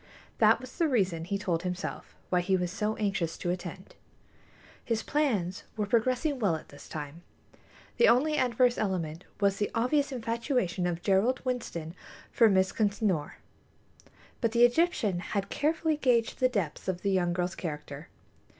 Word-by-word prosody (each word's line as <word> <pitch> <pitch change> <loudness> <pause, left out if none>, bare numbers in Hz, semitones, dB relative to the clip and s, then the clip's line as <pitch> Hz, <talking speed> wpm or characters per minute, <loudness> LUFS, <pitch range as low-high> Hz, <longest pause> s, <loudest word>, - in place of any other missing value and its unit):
That 220 +1 +5
was 255 0 -11
the 335 -2 +2
reason, 190 - 0
he 200 +3 -1
told 175 -4 -1
himself, 180 +1 -5 0.2
why 180 -1 +3
he 190 +1 +2
was 180 -1 -2
so 210 +2 -1
anxious 195 -6 -1
to 175 - -2
attend. 185 +1 -6 0.9
His 225 -2 -1
plans 210 - 0
were 210 - 0
progressing 255 +6 +1
well 195 -8 +2
at 155 - -9
this 145 - -13
time. 150 +2 -7 0.8
The 475 - +6
only 300 +6 +4
adverse 250 -2 +2
element 175 -5 -2
was 200 -1 +2
the 205 - 0
obvious 280 +5 +1
infatuation 230 - -1
of 175 -1 -3
Gerald 210 +6 +2
Winston 170 -11 -3 0.4
for 230 -2 +5
Miss 190 -1 +3
Consinor; 200 -7 0 1.1
but 230 -2 +1
the 240 0 +7
Egyptian 240 - +1
had 195 +2 -3
carefully 315 +1 0
gauged 245 -5 +1
the 255 - +4
depths 195 -11 -3
of 185 -1 -2
the 200 - +1
young 180 -2 +2
girl's 180 +1 -1
character. 150 -1 -6
200 Hz, 160 wpm, -29 LUFS, 180-245 Hz, 1.1 s, the